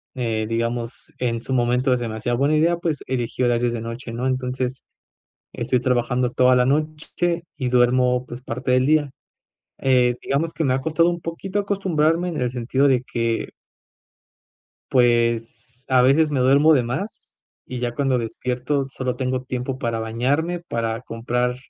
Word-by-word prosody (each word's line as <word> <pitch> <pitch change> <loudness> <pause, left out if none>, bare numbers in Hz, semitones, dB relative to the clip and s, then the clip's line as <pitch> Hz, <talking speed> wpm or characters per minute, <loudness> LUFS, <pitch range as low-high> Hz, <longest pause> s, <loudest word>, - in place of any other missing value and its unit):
eh, 115 -3 -1
digamos, 115 +1 -3
en 115 -2 -1
su 130 - -3
momento 125 +1 +2
es 125 - +1
demasiado 120 +1 -2
buena 145 +3 +3
idea. 170 +2 +3
Pues 165 -4 -2
elegí 125 -1 -2
horarios 120 0 +2
de 115 - -3
noche, 115 +1 -6
¿no? 120 +2 -3
Entonces 130 0 -2 0.7
estoy 125 -1 -1
trabajando 125 0 +1
toda 125 0 +4
la 125 0 +4
noche 155 +4 -1
y 130 -3 -2
duermo, 125 0 +3
pues 120 0 -8
parte 125 +1 -3
del 130 0 +3
día, 150 -1 +3 0.7
eh, 125 -2 +3
digamos 155 +4 -1
que 160 - -1
me 130 -2 +2
ha 135 - 0
costado 160 +3 +2
un 175 0 -2
poquito 185 +5 -3
acostumbrarme 180 -4 +1
en 155 - -4
el 125 -1 0
sentido 130 +3 +1
de 125 -2 +2
que 115 -2 -2 1.4
pues 120 0 +1
a 130 -1 +4
veces 150 +4 +4
me 140 - 0
duermo 140 +5 +5
de 130 - +4
más 175 - -6 0.2
y 130 - -5
ya 120 -1 -2
cuando 135 -1 +1
despierto, 125 +4 -2
solo 130 -2 -3
tengo 130 0 -2
tiempo 130 0 -4
para 115 -3 -2
bañarme 140 +10 -1
para 115 0 -2
comprar 125 +1 -2
125 Hz, 165 wpm, -22 LUFS, 120-145 Hz, 1.4 s, duermo